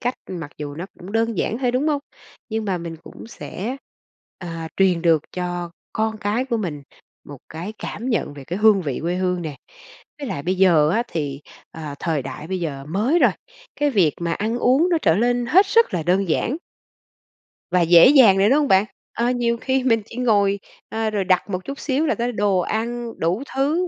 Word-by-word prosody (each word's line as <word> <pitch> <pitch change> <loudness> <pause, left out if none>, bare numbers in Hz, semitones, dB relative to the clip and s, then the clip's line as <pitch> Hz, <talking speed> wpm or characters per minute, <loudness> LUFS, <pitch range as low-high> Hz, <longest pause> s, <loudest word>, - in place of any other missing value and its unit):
cách 245 +1 -1 0.2
mặc 165 -5 -6
dù 145 -1 -5
nó 170 +5 -6
cũng 185 +3 -10
đơn 225 -2 0
giản 225 - -1
thôi, 250 -2 +1
đúng 260 +5 0
hông? 290 -2 0 0.5
Nhưng 220 0 -2
mà 190 -3 -1
mình 165 -1 -6
cũng - - -11
sẽ, 230 +1 -6 0.6
à, 165 -2 -6
truyền 185 -3 +3
được 165 -3 +4
cho 175 -1 -3 0.2
con 220 0 -1
cái 215 +5 -1
của 240 -3 -1
mình 160 -9 -4 0.4
một 145 -1 -10
cái 175 +7 -6
cảm 240 +5 -5
nhận 220 - -1
về 140 -2 -10
cái 180 +7 -4
hương 210 -3 +5
vị 140 -5 -3
quê 170 +2 -1
hương 180 -1 -1
nè. 150 -4 -5 0.6
Với 280 - -5
lại 140 - -4
bây 185 +4 0
giờ 165 -5 +5
á 225 +7 +2
thì, 145 -4 -3 0.3
ờ, 155 -3 -7
thời 155 -5 -1
đại 140 +3 -7
bây 190 -1 -2
giờ 140 -4 -4
mới 220 - +2
rồi, - - +5 0.5
cái 290 0 +1
việc 185 - +3
mà 170 -1 -1
ăn 225 +6 -1
uống 265 +9 +3
nó 335 - +3
trở 160 - +4
lên 245 +2 +1
hết 380 - +5
sức 460 - +3
là 170 - 0
đơn 185 +3 +1
giản 240 - 0 1.2
và 180 -1 +3
dễ 170 +5 +8
dàng 250 -9 +7
rồi, 200 +3 +4
đúng 285 +3 +4
hông 290 - +1
bạn? 190 -1 +4 0.3
Ờ, 235 +1 0
nhiều 235 -1 0
khi 260 +1 0
mình 225 -3 +3
chỉ 230 - -12
ngồi, 205 -5 +2 0.3
ờ, 220 0 -1
rồi 205 -2 -1
đặt 185 +1 +1
một 185 -1 -3
chút 275 0 -6
xíu 285 +2 0
là - - +1
có 240 +1 -1
đồ 205 -4 +1
ăn 235 +4 -2
đủ 180 +10 0
thứ 310 +7 +1
200 Hz, 215 wpm, -22 LUFS, 170-240 Hz, 1.2 s, dễ